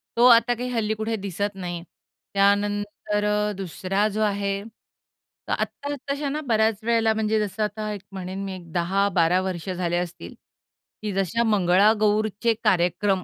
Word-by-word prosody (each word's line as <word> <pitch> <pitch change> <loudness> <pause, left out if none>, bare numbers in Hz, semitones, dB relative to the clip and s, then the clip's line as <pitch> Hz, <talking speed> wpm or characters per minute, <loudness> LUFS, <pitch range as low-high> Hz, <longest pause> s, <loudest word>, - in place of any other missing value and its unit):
तो 235 - +5
आता 235 +1 +6
काही 245 +1 -4
हल्ली 225 -3 0
कुठे 220 +1 -2
दिसत 200 +2 -2
नाही. 175 -3 -5 0.5
त्यानंतर 205 +1 +1
अ, 210 0 +1
दुसरा 195 +2 -1
जो 215 - 0
आहे, 200 -1 0 0.9
तर - - 0
आत्ता 285 0 -3
आत्ताशाना 285 +2 -3
बऱ्याच 220 -2 +2
वेळेला 225 -1 +3
म्हणजे 220 0 +1
जसं 210 +1 -2
आता 215 +1 -3
एक 205 - -7
म्हणेन, 190 0 -5
मी 195 - -4
एक 170 -3 -12
10-12 180 0 +2
वर्ष 185 -2 -4
झाले 175 -1 -1
असतील, 175 -1 -5 0.7
की 210 -1 -3
जसे 195 +4 0
मंगळागौरचे 210 +2 +3
कार्यक्रम 190 -1 +2
205 Hz, 145 wpm, -24 LUFS, 190-220 Hz, 0.9 s, आता